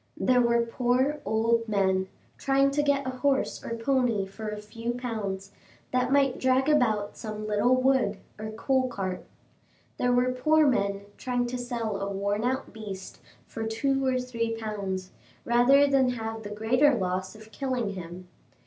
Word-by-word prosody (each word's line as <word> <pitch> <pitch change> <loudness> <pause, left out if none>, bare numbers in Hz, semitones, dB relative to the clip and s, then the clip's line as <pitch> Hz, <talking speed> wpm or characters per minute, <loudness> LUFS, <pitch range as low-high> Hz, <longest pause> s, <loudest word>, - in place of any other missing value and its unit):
There 250 -1 +3
were 235 -1 +3
poor 255 +5 0
old 230 +1 +1
men, 190 -2 +1 0.3
trying 275 0 +3
to 295 +1 +1
get 285 -1 +1
a 260 - -1
horse 280 -1 0
or 230 - -4
pony 235 -4 +1
for 215 +3 -7
a 210 - -5
few 230 +3 -5
pounds, 205 -6 -4 0.4
that 255 0 +1
might 275 -2 +3
drag 260 +1 +2
about 220 -9 +2
some 215 -1 -6
little 215 +4 +3
wood 255 -6 +2 0.2
or 215 0 -5
coal 255 +4 0
cart. 190 -6 -4 0.7
There 250 - +1
were 250 +1 +3
poor 305 +5 +3
men 200 -7 +1 0.2
trying 245 -1 -1
to 250 - -3
sell 235 -4 -3
a 195 0 -3
worn 200 +2 -1
out 260 +2 -2
beast 205 -3 -8 0.3
for 225 0 -5
two 270 +5 0
or 260 -1 +2
three 230 -2 -2
pounds, 195 -4 -4 0.3
rather 245 +4 +5
than 270 -2 +3
have 225 -2 -4
the 205 - -7
greater 245 +7 +3
loss 185 -1 -2
of 220 0 -14
killing 250 -2 -2
him. 180 0 -8
235 Hz, 165 wpm, -27 LUFS, 210-255 Hz, 0.7 s, rather